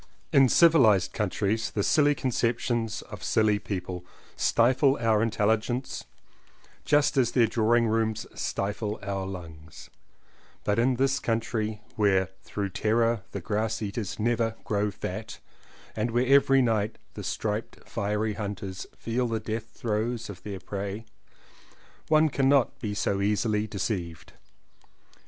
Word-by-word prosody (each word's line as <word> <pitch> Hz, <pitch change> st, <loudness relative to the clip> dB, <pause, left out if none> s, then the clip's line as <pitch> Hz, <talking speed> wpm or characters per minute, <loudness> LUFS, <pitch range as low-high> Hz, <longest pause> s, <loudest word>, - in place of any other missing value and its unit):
In 135 Hz, -2 st, +6 dB
civilized 125 Hz, -, +5 dB
countries 105 Hz, +1 st, -1 dB
the 100 Hz, -, -1 dB
silly 145 Hz, +4 st, +4 dB
concep 120 Hz, -3 st, 0 dB
tions 115 Hz, -4 st, -2 dB
of -, -, -10 dB
silly 105 Hz, -2 st, +2 dB
people 90 Hz, -3 st, -5 dB, 0.3 s
stifle 130 Hz, +4 st, +3 dB
our 110 Hz, -2 st, +3 dB
intelligence 110 Hz, +3 st, 0 dB, 0.8 s
just 145 Hz, -1 st, +3 dB
as 125 Hz, -3 st, +3 dB
their 120 Hz, -3 st, +5 dB
drawing 115 Hz, +1 st, +2 dB
rooms 110 Hz, -1 st, 0 dB
stifle 105 Hz, +2 st, -3 dB
our 100 Hz, -1 st, -3 dB
lungs, 80 Hz, -4 st, -10 dB, 0.7 s
but 105 Hz, +2 st, +1 dB
in 125 Hz, +2 st, +3 dB
this 135 Hz, +2 st, +1 dB
country 110 Hz, -2 st, -2 dB
where 95 Hz, -3 st, +3 dB
through 100 Hz, -1 st, -4 dB
terror 115 Hz, +3 st, +1 dB
the 100 Hz, -, -5 dB
grass 110 Hz, +4 st, -1 dB
eaters 105 Hz, -2 st, -4 dB
never 115 Hz, 0 st, 0 dB
grow 105 Hz, 0 st, 0 dB
fat 100 Hz, -, -6 dB, 0.6 s
and 110 Hz, +2 st, -1 dB
where 120 Hz, +2 st, +1 dB
every 135 Hz, 0 st, +5 dB
night 110 Hz, -2 st, 0 dB, 0.2 s
the -, -, -7 dB
striped 105 Hz, +1 st, -4 dB
fiery 105 Hz, 0 st, -1 dB
hunters 100 Hz, -2 st, -5 dB
feel 120 Hz, +2 st, -1 dB
the 115 Hz, -1 st, -1 dB
death 110 Hz, +1 st, -4 dB
throes 115 Hz, 0 st, -2 dB
of 90 Hz, -, -12 dB
their 100 Hz, -2 st, -6 dB
prey 100 Hz, +3 st, -5 dB, 1.0 s
one 155 Hz, 0 st, +5 dB
cannot 140 Hz, -2 st, +2 dB
be 105 Hz, -2 st, -3 dB
so 100 Hz, -1 st, 0 dB
easily 105 Hz, +1 st, +1 dB
deceived. 90 Hz, -5 st, -4 dB
110 Hz, 130 wpm, -27 LUFS, 105-120 Hz, 1.0 s, In